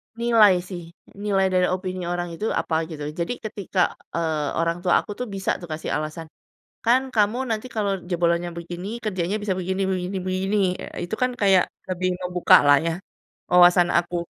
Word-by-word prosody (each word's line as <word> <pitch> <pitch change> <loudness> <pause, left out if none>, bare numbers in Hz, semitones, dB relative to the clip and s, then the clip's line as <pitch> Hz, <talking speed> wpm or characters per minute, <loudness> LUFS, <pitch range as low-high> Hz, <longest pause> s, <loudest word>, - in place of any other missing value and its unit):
Nilai 230 -4 +5
sih. 180 -3 -6 0.4
Nilai 200 -2 +1
dari 180 0 +3
opini 185 -1 -4
orang 175 0 -2
itu 185 +6 -4 0.2
apa 160 - -3
gitu, 155 -3 -7 0.2
jadi 170 +8 -1
ketika, 200 -3 -4 0.4
eee, 160 -3 -1
orang 165 0 +1
tuh 185 - +1
aku - - -7
tuh 250 - -3
bisa 195 -1 -3
tuh 175 - -8
aku 160 - -4
kasih 155 - -5
alasan. 155 +2 -5 0.6
"Kan 240 +3 +5
kamu 215 +2 +2
nanti 220 +2 -2
kalau 205 -3 0 0.2
jebolannya 170 0 +1
begini, 175 +2 -6 0.2
kerjanya 190 -2 -1
bisa 200 -2 0
begini 190 +1 -2
begini 185 +1 -2
begini." 190 +2 -1 0.3
Eee, - - -6
itu 175 - -4
kan 250 - +3
kayak 195 -3 +5 0.3
lebih 185 0 -1
ngebuka 180 -1 +4
lah 145 0 +7
ya 165 - +1 0.6
wawasan 175 0 +6
aku. 175 +1 -2
185 Hz, 175 wpm, -23 LUFS, 175-200 Hz, 0.6 s, lah